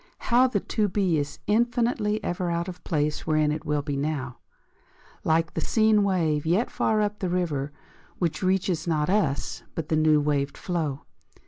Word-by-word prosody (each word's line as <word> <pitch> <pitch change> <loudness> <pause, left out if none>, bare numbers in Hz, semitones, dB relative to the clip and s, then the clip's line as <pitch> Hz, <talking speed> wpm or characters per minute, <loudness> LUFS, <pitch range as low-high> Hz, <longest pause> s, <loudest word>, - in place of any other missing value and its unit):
How 250 +2 +3
the 225 -5 0
to 210 +2 0
be 185 -5 +1
is 145 0 -4
infinitely 230 -1 +1
ever 175 0 -2
Out 170 0 -1
of 180 -1 -6
the - - -31
place 150 -2 -1
wherein 155 -1 +2
it 155 0 -4
will 150 -1 0
be 145 -1 -3
Now, 140 -4 -3 0.8
Like 165 0 +1
the - - -2
seen 220 -2 +3
wave 165 -7 +1
yet 180 +9 +1
far 215 -1 +1
up 210 0 -3
in 185 - +1
the 180 - 0
river, 150 -6 -1 0.5
Which 170 -4 -1
reaches 185 -3 0
not 155 0 +1
us, 145 -10 0
but 160 0 -4
the 160 - +2
new 155 -1 +4
waved 145 -1 0
flow! 155 -6 -3
170 Hz, 185 wpm, -26 LUFS, 150-205 Hz, 0.8 s, new